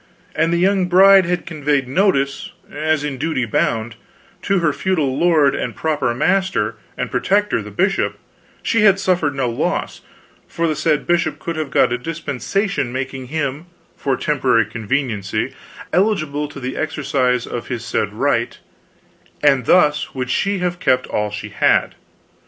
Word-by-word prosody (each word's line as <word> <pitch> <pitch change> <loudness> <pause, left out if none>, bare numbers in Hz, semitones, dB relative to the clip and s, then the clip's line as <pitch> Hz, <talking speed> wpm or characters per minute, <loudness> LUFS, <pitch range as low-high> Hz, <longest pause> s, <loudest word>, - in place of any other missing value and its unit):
An 165 +1 +2
the 170 - +1
young 190 +1 +2
bride 190 0 +7
had 180 0 -1
conveyed 145 -4 -1
notice, 140 -3 0 0.2
as 155 0 0
in 140 -3 -4
duty 155 -4 -1
bound, 110 0 -1 0.4
to 195 - +1
her 165 -4 +1
feudal 155 -9 0
lord 155 -4 +3
and - - -3
proper 150 -6 0
master 125 - +1 0.2
and 125 - -3
protector 200 +12 +1
the - - -9
bishop, - - 0 0.5
she 230 - +1
had 200 -2 +5
suffered 175 -7 +1
no 135 -2 0
loss, 115 - -2 0.5
for 170 0 -1
the 155 - 0
said 150 0 0
bishop 175 0 +1
could 170 - -5
have 155 -2 -3
got 125 - +3
a 125 - -2
dispensation 165 - -2
making 130 0 -5
him, 150 +2 -3 0.3
for 135 -2 -1
temporary 130 -7 +2
conveniency, 110 -1 -2 0.4
eligible 155 -7 +1
to 145 - -10
the 130 0 -4
exercise 130 -5 0
of - - -6
his - - -4
said - - -1
right, - - 0 0.9
and 135 -4 +4
thus 150 -6 +3
would 130 -1 -3
she 200 +7 0
have 180 -1 -2
kept 130 -7 +2
all 105 0 -2
she 105 - -6
had. - - +2
150 Hz, 155 wpm, -19 LUFS, 130-175 Hz, 0.9 s, bride